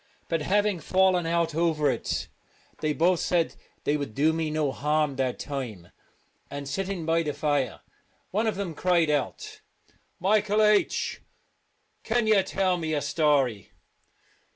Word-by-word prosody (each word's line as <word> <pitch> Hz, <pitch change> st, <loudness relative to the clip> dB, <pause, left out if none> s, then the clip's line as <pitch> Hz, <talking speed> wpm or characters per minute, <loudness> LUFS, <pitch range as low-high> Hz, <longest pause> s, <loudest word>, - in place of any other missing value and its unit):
But 165 Hz, -2 st, -1 dB
having 205 Hz, +3 st, +1 dB
fallen 185 Hz, -1 st, +2 dB
out 165 Hz, -1 st, +1 dB
over 160 Hz, -2 st, +1 dB
it, 125 Hz, -4 st, -1 dB, 0.5 s
they 155 Hz, -, 0 dB
both 170 Hz, +3 st, +2 dB
said 170 Hz, -2 st, 0 dB, 0.3 s
they 150 Hz, -, +1 dB
would 140 Hz, -7 st, -5 dB
do 155 Hz, +3 st, +3 dB
me 160 Hz, -1 st, -1 dB
no 150 Hz, -2 st, 0 dB
harm 150 Hz, 0 st, 0 dB
that 130 Hz, -2 st, -1 dB
time; 120 Hz, -, -6 dB, 0.6 s
and, 140 Hz, 0 st, -6 dB
sitting 190 Hz, +1 st, -3 dB
by 165 Hz, +1 st, +2 dB
the 150 Hz, -3 st, -2 dB
fire, 145 Hz, -3 st, -1 dB, 0.5 s
one 215 Hz, +4 st, +1 dB
of 220 Hz, -, 0 dB
them 190 Hz, -4 st, -4 dB
cried 170 Hz, -1 st, +2 dB
out: 145 Hz, -2 st, -3 dB, 0.3 s
" -, -, -30 dB, 0.3 s
Michael 210 Hz, +1 st, +2 dB
H, 210 Hz, -1 st, +2 dB, 0.8 s
can 235 Hz, 0 st, +1 dB
you 215 Hz, -2 st, +5 dB
tell 190 Hz, -1 st, 0 dB
me 160 Hz, -2 st, -2 dB
a 145 Hz, -, 0 dB
story?" 140 Hz, -, +1 dB
160 Hz, 150 wpm, -26 LUFS, 145-190 Hz, 0.8 s, you